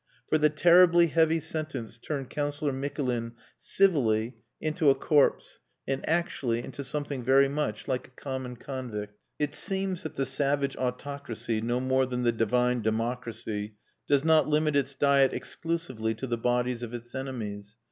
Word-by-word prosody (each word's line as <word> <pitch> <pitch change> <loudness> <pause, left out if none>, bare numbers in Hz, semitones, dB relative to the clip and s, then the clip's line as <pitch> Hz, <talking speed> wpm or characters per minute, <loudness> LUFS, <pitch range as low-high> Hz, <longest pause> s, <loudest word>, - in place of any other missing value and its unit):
For 155 - +3
the 150 0 +5
terribly 175 +2 +6
heavy 165 0 +3
sentence 155 -9 -5
turned 135 0 -4
Councillor 145 0 -1
Mikulin 130 -4 -2 0.3
civilly 125 - +2 0.3
into 155 -1 +2
a 135 - +5
corpse, 145 +1 +2 0.3
and 135 0 -1
actually 135 -8 0
into 140 - -7
something 140 -1 -4
very 135 +2 +5
much 140 -7 -3
like 130 -1 -2
a 130 - -20
common 130 -2 -5
convict. 115 -6 -6 0.2
It 150 -1 -1
seems 190 +1 -2
that 155 - -7
the 135 - 0
savage 140 +1 0
autocracy, 125 -3 -3
no 120 +2 0
more 130 0 +2
than 125 -1 -2
the 120 - +4
divine 125 +2 +1
democracy, 110 -2 -3 0.3
does 140 -1 +3
not 160 -1 +4
limit 150 0 +2
its 140 -1 +1
diet 140 -1 +4
exclusively 130 -10 -2
to 115 - -5
the 120 -2 -1
bodies 125 +1 0
of 120 0 -5
its 120 0 -9
enemies. 110 -6 -5
130 Hz, 155 wpm, -28 LUFS, 120-150 Hz, 0.3 s, terribly